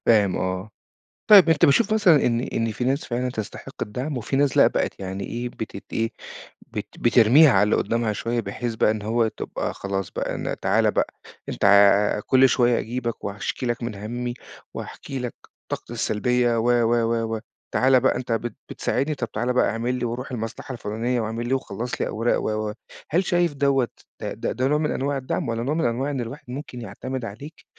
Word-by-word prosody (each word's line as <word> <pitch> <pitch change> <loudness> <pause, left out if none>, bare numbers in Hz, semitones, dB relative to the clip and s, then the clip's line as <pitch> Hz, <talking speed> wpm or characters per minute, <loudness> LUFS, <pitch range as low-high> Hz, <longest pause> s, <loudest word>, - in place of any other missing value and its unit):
فاهم 105 -5 +4
آه، 95 +2 -3 0.6
طيب 195 -5 +9
أنت 160 - +5
بتشوف 170 +9 +3
مثلًا 185 -9 +5
إن 115 -1 +2
إن 115 -3 -1
في 115 - -4
ناس 135 +4 0
فعلًا 125 +1 -2
تستحق 110 -4 -7
الدعم، 130 +7 -3
وفي 125 +3 -3
ناس 140 -1 +2
لأ، - - +8
بقت - - -1
يعني 95 +1 -4
إيه 120 +1 -4
بتت 110 -4 -7
إيه 115 +1 0 0.6
بت - - -4
بترْميها 125 +6 +6
على 100 -3 +4
اللي 105 - +3
قدامها 115 -2 0
شوية، 120 +3 -2
بحيث 115 +3 -4
بقى 110 - +3
إن 110 -1 -3
هو 115 +2 +1
تبقى - - -4
خلاص 95 -2 -3
بقى، - - -3
أنا - - -3
تعال - - +2
بقى - - 0 0.4
أنت - - -2 0.6
كُلّ 130 0 +6
شوية 120 -2 +3
أجيْبك 120 0 -4
وهاشْكي 100 +5 -3
لك 120 0 -2
من 115 -3 -4
همّي 120 +4 -4 0.4
وهاحكي 135 - -6
لك 125 -1 -4 0.4
طاقتي - - -5
السلبية 120 +2 +1
و، - - 0
و، 120 -1 +3
و، 115 -1 0
و - - -4 0.3
تعالَ 130 0 +5
بقى 130 - +2
أنت 125 -1 -4
بت 115 +1 -2
بتساعدني، 145 +4 -1
طب 120 -5 -4
تعالَ 120 +4 -1
بقى 125 - +3
أعمل 115 +4 -1
لي 125 - -2
وروْح 120 +3 -4
المصلحة 115 +2 -5
الفُلانية 120 +2 -2
واعمل 115 +2 -3
لي 130 - 0
وخلّص 120 -2 -3
لي - - +1
أوراق 115 +2 0
و، 110 0 -1
و - - -5 0.4
هل 175 +5 +2
شايف 175 -3 +2
دوّة 140 -3 +2 0.3
أ - - -3
د - - -14 0.2
ده 130 +1 +2
نوع 150 +2 +2
من 150 0 0
أنواع 140 +1 -1
الدعم، 135 +2 -2
والّا 115 0 -2
نوع 140 +5 0
من 165 - 0
أنواع 125 +5 0
إن 135 -3 -2
الواحد 120 +5 -7
ممكن 130 -2 -7
يعتمد 120 +4 -5
عليك 140 +10 -10
120 Hz, 200 wpm, -24 LUFS, 110-130 Hz, 0.6 s, طيب